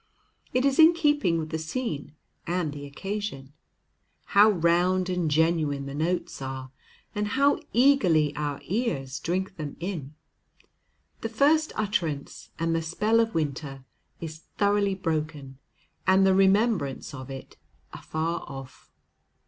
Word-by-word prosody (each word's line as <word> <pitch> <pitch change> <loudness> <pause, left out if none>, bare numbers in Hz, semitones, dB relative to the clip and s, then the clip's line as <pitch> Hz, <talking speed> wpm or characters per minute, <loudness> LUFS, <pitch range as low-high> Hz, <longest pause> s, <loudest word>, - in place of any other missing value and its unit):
It 255 +2 +1
is 275 +1 +2
in 325 +2 +8
keeping 295 - +2
with 160 -1 -3
the 160 - -2
scene 155 - -4 0.3
and 170 -4 -1
the 145 -1 -7
occasion. 190 -4 -5 0.7
How 205 +2 +6
round 180 0 +2
and 180 -3 0
genuine 155 -2 +1
the 140 - -6
notes 160 +1 -2
are, 130 -1 -6 0.4
and 210 0 -1
how 280 +7 +3
eagerly 185 - +4
our 145 -1 -3
ears 180 - -2
drink 185 +2 -2
them 150 -3 -6
in! 160 -5 -5 1.0
The 225 - -3
first 300 +7 +3
utterance, 170 -9 -2
and 165 +1 0
the 165 - +1
spell 210 +8 +1
of 225 -3 +1
winter 140 -3 -3 0.3
is 160 -1 -7 0.2
thoroughly 200 -1 +2
broken, 155 -6 -3 0.5
and 190 +1 +5
the 190 - +5
remembrance 195 - +2
of 130 -1 -8
it 135 -1 -9 0.4
afar 165 +2 -3
off. 135 -2 -10
170 Hz, 130 wpm, -27 LUFS, 145-205 Hz, 1.0 s, in